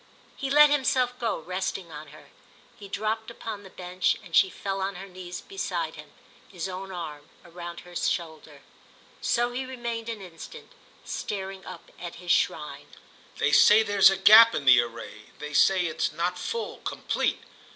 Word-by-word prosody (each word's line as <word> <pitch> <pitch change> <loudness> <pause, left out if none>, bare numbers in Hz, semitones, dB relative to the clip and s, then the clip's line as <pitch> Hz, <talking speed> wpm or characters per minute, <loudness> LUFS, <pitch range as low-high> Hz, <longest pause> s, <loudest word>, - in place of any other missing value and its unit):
He 275 - -4
let 295 +1 +7
himself 255 -3 +1
go, 230 -2 -1
resting 185 +1 -4
on 150 0 -9
her; - - -16 0.5
he 200 - -11
dropped 220 +2 -3
upon 225 -3 -7
the 195 - -13
bench 180 0 -1
and 170 -4 -6
she 190 +4 +6
fell 195 +1 -4
on 195 +1 -2
her 195 +2 -8
knees 180 -1 -8
beside 390 -1 -4
him, - - -12 0.4
his 180 -2 -5
own 190 +1 -7
arm 155 -5 -7
round 170 0 -9
her 175 0 -15
shoulder. 160 -4 -3 0.6
So 240 0 +1
he 250 +2 -3
remained 235 -3 -5
an 225 -2 -5
instant, 180 - -11 0.3
staring 195 -1 -5
up - - -11
at - - -7
his - - -3
shrine. - - 0 0.5
"They - - +1
say 215 +1 +7
there's 200 -2 +6
a 195 - 0
gap 220 +4 +8
in 140 - -3
the 130 -2 +8
array—they 120 +5 -9
say 185 +4 +4
it's 160 -1 -1
not 170 +3 -2
full, 465 0 -4
complete. - - -2
190 Hz, 165 wpm, -26 LUFS, 170-225 Hz, 0.6 s, gap